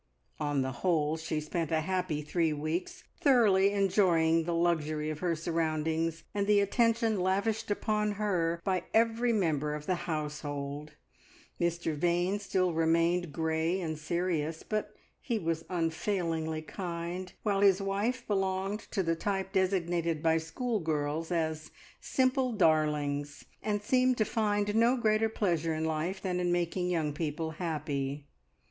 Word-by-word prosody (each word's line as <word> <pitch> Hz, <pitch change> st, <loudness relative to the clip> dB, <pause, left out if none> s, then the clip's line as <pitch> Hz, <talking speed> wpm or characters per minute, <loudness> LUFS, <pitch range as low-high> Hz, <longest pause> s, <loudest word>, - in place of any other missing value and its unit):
On 145 Hz, -3 st, 0 dB
the 130 Hz, -, -2 dB
whole 160 Hz, -4 st, +2 dB
she 160 Hz, -1 st, -3 dB
spent 155 Hz, +1 st, -3 dB
a 160 Hz, -1 st, +2 dB
happy 180 Hz, -3 st, -1 dB
three 165 Hz, +1 st, +1 dB
weeks, 155 Hz, +4 st, -3 dB, 0.2 s
thoroughly 210 Hz, -8 st, +5 dB
enjoying 175 Hz, -5 st, +3 dB
the 170 Hz, 0 st, -1 dB
luxury 155 Hz, -3 st, 0 dB
of 155 Hz, -, -6 dB
her 175 Hz, -1 st, 0 dB
surroundings 160 Hz, 0 st, -1 dB
and 200 Hz, -1 st, 0 dB
the 210 Hz, -1 st, +5 dB
attention 225 Hz, +1 st, +2 dB
lavished 200 Hz, +5 st, 0 dB
upon 210 Hz, 0 st, 0 dB
her 180 Hz, -5 st, 0 dB
by 185 Hz, -2 st, 0 dB
every 230 Hz, +1 st, +3 dB
member 155 Hz, -8 st, 0 dB
of 150 Hz, 0 st, -7 dB
the 180 Hz, 0 st, -2 dB
household. 150 Hz, -1 st, -4 dB, 0.7 s
Mr 170 Hz, -2 st, 0 dB
Vane 175 Hz, +5 st, +1 dB
still 185 Hz, -3 st, 0 dB
remained 165 Hz, +1 st, +2 dB
grey 160 Hz, +3 st, 0 dB
and 160 Hz, -3 st, -3 dB
serious, 165 Hz, -1 st, -1 dB
but 215 Hz, -1 st, -3 dB, 0.3 s
he 235 Hz, -3 st, -1 dB
was 165 Hz, -4 st, -2 dB
unfailingly 165 Hz, -2 st, -1 dB
kind; 175 Hz, +1 st, -5 dB
while 200 Hz, -2 st, +1 dB
his 195 Hz, -1 st, +5 dB
wife 205 Hz, +6 st, -1 dB
belonged 195 Hz, 0 st, -1 dB
to 195 Hz, -, 0 dB
the 165 Hz, -1 st, +1 dB
type 195 Hz, +2 st, -2 dB
designated 175 Hz, -4 st, 0 dB
by 165 Hz, 0 st, +3 dB
schoolgirls 160 Hz, -, -2 dB
as 160 Hz, -2 st, -1 dB, 0.3 s
"simple 255 Hz, -1 st, +1 dB
darlings," 150 Hz, -5 st, +1 dB, 0.2 s
and 210 Hz, -1 st, -1 dB
seemed 255 Hz, +2 st, +3 dB
to 215 Hz, -, +2 dB
find 205 Hz, -2 st, 0 dB
no 235 Hz, +3 st, +4 dB
greater 220 Hz, -1 st, +2 dB
pleasure 170 Hz, -7 st, 0 dB
in 160 Hz, +1 st, -1 dB
life 160 Hz, +5 st, -1 dB
than 180 Hz, -2 st, -2 dB
in 175 Hz, -1 st, +1 dB
making 175 Hz, +1 st, 0 dB
young 160 Hz, -4 st, 0 dB
people 160 Hz, +1 st, -3 dB
happy. 145 Hz, -4 st, -3 dB
170 Hz, 140 wpm, -30 LUFS, 160-200 Hz, 0.7 s, thoroughly